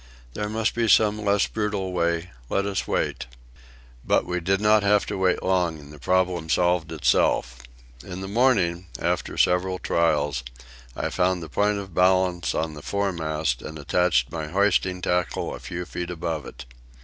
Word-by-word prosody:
There 105 +8 -3
must 110 +1 0
be 115 -1 0
some 105 0 +4
less 100 -1 +3
brutal 105 -3 -2
way. 85 0 0 0.2
Let 100 - 0
us 100 -1 -2
wait." - - -1 0.8
But - - +2
we 90 0 -2
did 95 +3 +1
not 105 0 +4
have 100 0 +3
to - - -4
wait 95 -1 +1
long, 90 -3 +1
and 75 0 -13
the 75 - -13
problem 90 0 0
solved 85 0 +1
itself. 65 -5 +1 0.4
In 95 0 -7
the 95 - -5
morning, 95 -6 +2
after - - -2
several 90 +1 +2
trials, 75 -7 0 0.5
I - - -2
found 90 -1 +1
the 80 - -8
point 105 +5 +1
of 95 -3 -7
balance 90 -1 +2
in 80 -1 -1
the 75 - -9
foremast 80 -9 -1
and 80 +1 -7
attached 75 -3 +1
my 80 -2 -4
hoisting 95 0 +1
tackle 90 0 -1
a - - -7
few 90 +1 -6
feet 90 -1 -5
above 85 -3 -4
it. - - -10
90 Hz, 170 wpm, -24 LUFS, 80-100 Hz, 0.8 s, some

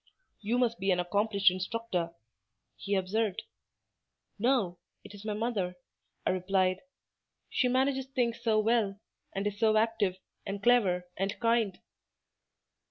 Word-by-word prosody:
"You 225 +4 0
must 240 -2 +1
be 195 +1 0
an 180 -1 +3
accomplished 200 +2 +3
instructor," 185 -3 -3 0.6
he 200 0 -2
observed. 195 +1 0 1.0
"No, 210 -7 +1 0.2
it - - -12
is 205 0 -11
my 215 -1 -2
mother," 210 -5 -1 0.5
I - - +3
replied; 185 0 +1 0.7
"she 255 - +2
manages 265 +1 +1
things 240 -3 -1
so 225 -2 +2
well, 215 -2 +2 0.4
and 195 +1 -1
is 205 0 -2
so 220 -1 +4
active, 215 -4 +1 0.3
and 200 0 -5
clever, 195 -7 +3
and 195 +2 -2
kind." 230 -4 +1
205 Hz, 130 wpm, -30 LUFS, 190-230 Hz, 1.0 s, so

